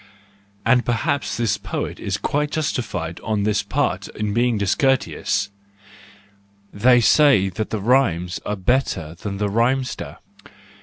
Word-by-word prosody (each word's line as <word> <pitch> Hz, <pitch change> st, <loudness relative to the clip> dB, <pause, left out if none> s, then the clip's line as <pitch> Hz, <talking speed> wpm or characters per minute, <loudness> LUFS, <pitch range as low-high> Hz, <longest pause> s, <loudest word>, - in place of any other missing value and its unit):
And 125 Hz, +1 st, +4 dB
perhaps 120 Hz, +4 st, -1 dB
this 115 Hz, -4 st, 0 dB
poet -, -, -4 dB
is -, -, -2 dB
quite 150 Hz, +1 st, -1 dB
justified 125 Hz, -, -3 dB
on 105 Hz, -2 st, -1 dB
his 105 Hz, -1 st, +1 dB
part 100 Hz, -, -1 dB
in 105 Hz, -1 st, -4 dB
being 120 Hz, 0 st, +2 dB
discourteous; 105 Hz, -2 st, 0 dB, 1.2 s
they 125 Hz, +4 st, +5 dB
say 120 Hz, -5 st, +5 dB
that 105 Hz, +4 st, -4 dB
the 110 Hz, -, -2 dB
rhymes 95 Hz, -7 st, +1 dB
are 105 Hz, -, -2 dB
better 95 Hz, -, 0 dB
than 100 Hz, +3 st, -6 dB
the 105 Hz, +1 st, 0 dB
rhymester. 120 Hz, +5 st, -1 dB
110 Hz, 125 wpm, -21 LUFS, 100-130 Hz, 1.2 s, they